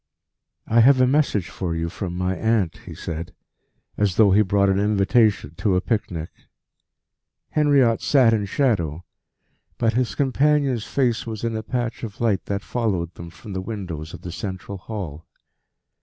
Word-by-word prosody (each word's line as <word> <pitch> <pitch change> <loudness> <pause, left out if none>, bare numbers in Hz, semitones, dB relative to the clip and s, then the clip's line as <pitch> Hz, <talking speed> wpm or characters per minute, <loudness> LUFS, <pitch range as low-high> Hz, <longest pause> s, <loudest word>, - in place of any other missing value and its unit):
"I 115 - +3
have 130 +3 +6
a 130 - +6
message 130 - +1
for 85 -3 -3
you 80 0 -2
from 90 +1 -5
my 90 +1 0
aunt," 110 -6 0
he - - -8
said, 80 0 -6 0.6
as 100 -4 +1
though 105 -2 +5
he 100 +3 +5
brought 100 0 +2
an 95 0 +2
invitation 105 -3 +2
to 100 -4 +1
a - - +4
picnic. 90 -7 -2 1.2
Henriot 140 -6 +3
sat 130 -5 +4
in 105 -2 +1
shadow, 90 - 0 0.7
but 115 -1 +1
his 125 +1 0
companion's 140 -3 +2
face 120 -4 0
was 110 -1 -5
in 115 -1 -1
a 110 - -2
patch 120 +1 -3
of 110 -4 -7
light 110 -5 +1
that 100 0 -3
followed 95 -8 -2
them 85 +1 -9
from 100 +4 -10
the 95 - -2
windows 90 -7 -6
of - - -12
the 90 - -6
central 95 +2 -6
hall. 90 -7 -7
105 Hz, 165 wpm, -23 LUFS, 90-120 Hz, 1.2 s, have